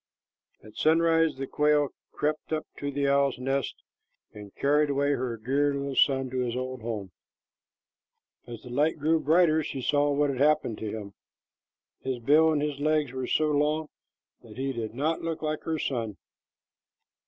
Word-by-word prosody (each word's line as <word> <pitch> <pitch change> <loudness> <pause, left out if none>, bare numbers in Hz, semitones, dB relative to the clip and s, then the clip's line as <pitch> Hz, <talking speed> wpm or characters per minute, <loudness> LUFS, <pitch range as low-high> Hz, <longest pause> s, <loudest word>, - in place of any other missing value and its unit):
At 110 - -14
sunrise 165 0 +3
the 135 - -3
quail 150 0 +2 0.2
crept 150 +1 -2
up 155 -1 -1
to 145 - -3
the 140 0 -1
owl's 140 -1 +2
nest 135 +1 -2 0.5
and 105 -1 -10
carried 150 +1 +2
away 140 +1 +1
her 125 -4 -2
dear 140 +5 +1
little 140 -1 -3
son 135 -1 +3
to 130 - -2
his 125 -1 -1
old 130 -1 -4
home. 105 -5 -5 1.4
As 120 -2 -9
the 125 - -10
light 150 +6 +1
grew 160 +2 +2
brighter, 160 0 +3
she 140 -2 -5
saw 145 +2 +2
what 145 0 +2
had 130 - -5
happened 145 -6 +2
to 110 - -4
him. 100 -2 -7 0.9
His 130 -1 -3
bill 150 +7 +4
and 150 -2 0
his 145 -2 -3
legs 150 -2 +1
were 130 -1 -4
so 155 -1 +2
long 150 +1 +1 0.5
that 110 -1 -14
he 135 +1 -2
did 115 -2 -5
not 155 +5 0
look 165 -1 -4
like 155 0 -2
her 160 -1 -1
son. 115 -8 -3
140 Hz, 170 wpm, -27 LUFS, 125-150 Hz, 1.4 s, bill